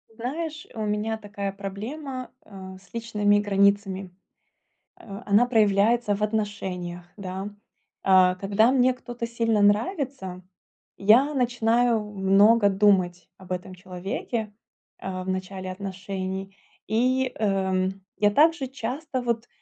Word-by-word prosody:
Знаешь, 305 +6 -4
у 220 - -5
меня 210 +1 -1
такая 200 -2 -5
проблема, 250 +8 -6
э, 190 -2 -10
с 195 - -24
личными 210 -3 +1
границами. 200 -2 +1 0.8
Э, 200 +2 -9
она 205 +4 +4
проявляется 215 -1 +3
в 200 - -8
отношениях, 190 -5 -3
да. 190 0 -5 0.5
Э, 185 -1 +5
когда 205 +5 +2
мне 255 -1 +4
кто-то 240 -1 -6
сильно 230 -2 +1
нравится, 210 - 0 0.6
я 240 +9 +5
начинаю 240 -3 +2
много 205 +2 +4
думать 190 -4 +2
об 185 -1 -13
этом 185 +1 -4
человеке, 190 +4 -4 0.5
э, 185 -1 -5
в 185 - -5
начале 185 0 -4
отношений. 190 0 -5 0.3
И, 255 +4 +1
эм, 190 -2 0 0.2
я 205 -1 +3
также 300 +3 +3
часто, 260 +2 -4
вот, 235 -1 -2
205 Hz, 115 wpm, -25 LUFS, 190-235 Hz, 0.8 s, Э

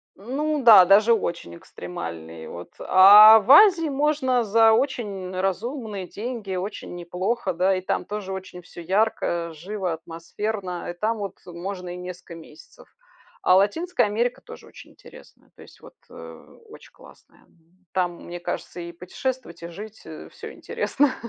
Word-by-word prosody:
Ну 285 +7 -3
да, 215 -6 +9
даже 210 +5 +5
очень 170 - -4
экстремальные. 85 -2 -9
Вот. 85 +1 -9
А 210 +4 +8
в 215 +4 -10
Азии 340 0 +7
можно 275 -3 0
за 225 +1 +4
очень 215 -7 -2
разумные 205 +1 -4
деньги, 215 -3 -6
очень 185 0 -6
неплохо, 185 +4 -3
да, 185 +3 +1
и - - -4
там 185 - -3
тоже 205 -2 -6
очень 185 -1 -9
всё 175 - -12
ярко, 175 -2 -1
живо, 185 +2 -5
атмосферно, 175 +3 -6
и - - -4
там 215 +6 -2
вот 200 -3 -6
можно 180 +1 -7
и 180 - -7
несколько 180 -1 -9
месяцев. 155 -2 -16 0.5
А 185 - +4
Латинская 245 - +1
Америка 230 +3 -1
тоже - - -13
очень - - -15
интересная, - - -18
то - - -17
есть - - -17
вот, - - -16
э, - - -13
очень 445 - -15
классная. - - -20 0.5
Там, 175 -2 -2
мне 175 0 -8
кажется, 175 - -6
и 170 0 -8
путешествовать, 180 +3 -6
и - - -5
жить 210 +5 -10 0.3
всё 445 -1 -10
интересно. 285 - -1
195 Hz, 150 wpm, -23 LUFS, 175-230 Hz, 0.5 s, да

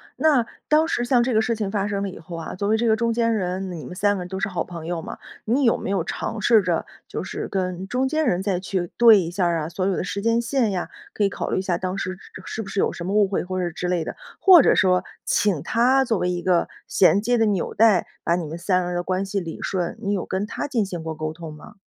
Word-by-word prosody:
那 285 -7 +3 0.2
当 310 +1 +4
时 240 - -1
像 245 0 +3
这 250 -1 0
个 220 - +4
事 230 +1 0
情 210 -3 -2
发 205 -1 0
生 200 -1 -2
了 200 - -2
以 - - -9
后 170 0 -8
啊， 165 - -6
作 200 +2 -2
为 220 - +3
这 235 +1 0
个 220 - +4
中 230 +1 0
间 230 0 +1
人， 185 -1 -2
你 165 -4 -7
们 - - -8
三 205 +2 +1
个 - - -4
人 180 - -9
都 190 0 -4
是 200 - 0
好 180 -3 -2
朋 170 -3 -8
友 170 -1 -3
嘛。 - - -7 0.3
你 250 +6 +1
有 230 - +4
没 - - -5
有 190 -4 0
尝 225 - -4
试 220 0 +5
着 175 -3 -1 0.2
就 - - -4
是 - - -5
跟 185 -1 -2
中 255 +3 +1
间 310 +2 0
人 185 -7 +1
再 190 -2 0
去 185 -2 -2
对 230 -3 +8
一 170 -3 -2
下 180 +1 -1
儿 170 -1 +1
啊， 150 - -3
所 185 +2 -2
有 195 -2 +1
的 - - -2
时 200 +2 -3
间 230 +1 +2
线 235 -3 0
呀， 180 - -2 0.3
可 210 - +1
以 - - +2
考 - - -4
虑 - - 0
一 - - 0
下 180 -2 -1
当 185 +2 -3
时 185 -1 -3
是 185 - -13
是 225 - -4
不 195 - -8
是 200 - -2
有 - - +1
什 170 - -7
么 190 - -2
误 210 -1 +4
会 190 - -1
或 185 +1 -3
者 175 -2 -1
之 180 +2 -4
类 175 -3 0
的？ - - -5 0.2
或 365 -6 +8
者 - - +4
说 185 -1 +3 0.2
请 195 -8 +1
她 260 +4 +3
作 225 -3 +1
为 180 - 0
一 175 -1 -3
个 180 -2 +1 0.2
衔 195 +2 +4
接 245 +2 +1
的 225 - +3
纽 195 -4 -1
带， 215 -4 +4 0.2
把 170 - +2
你 170 - -3
们 160 +3 -6
三 180 +1 +1
个 - - -4
人 180 - -3
的 175 - -1
关 185 +2 -1
系 195 0 -2
理 165 -2 -7
顺， 180 +1 -2
你 205 -2 -1
有 190 - -2
跟 190 +2 -2
她 - - -4
进 240 -8 0
行 175 -4 -6
过 160 0 -4
沟 155 0 -4
通 165 -2 -9
吗？ 150 +7 -13
195 Hz, 320 characters per minute, -23 LUFS, 180-225 Hz, 0.3 s, 对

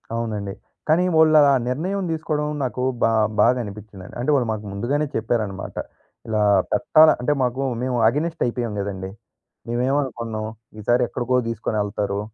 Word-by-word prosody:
అవునండి. 105 -4 -3 0.3
కానీ 160 +3 +4
వాళ్ళు 160 -1 +5
అలా 145 -1 +6 0.2
నిర్ణయం 185 +10 -2
తీసుకోవడం 155 -2 -2 0.2
నాకు 125 0 -2 0.2
బా - - +5 0.3
బాధ 120 - +6
అనిపించిందండి. 100 -2 -10
అంటే 125 +5 -2
వాళ్ళు 125 -4 +1
మాకు 110 -1 -4
ముందుగానే 135 +10 -1
చెప్పారన్నమాట. 110 -3 -2 0.5
ఇలా 110 -1 0 0.3
పెట్టాల 155 +5 +5
అంటే 145 +4 +2
మాకు 130 +1 0 0.2
మేము 125 -1 -1
ఎగైనెస్ట్ 160 +6 -3
అయిపోయాం 120 -2 -2
కదండీ. 95 -1 -4 0.6
మేమేమనుకున్నాం? 120 -3 -1 0.3
ఈసారి 120 +4 +2
ఎక్కడికో 125 +1 -1
తీసుకొని 110 -1 -3
వెళ్తారు 100 -1 -2
120 Hz, 135 wpm, -22 LUFS, 105-145 Hz, 0.6 s, అలా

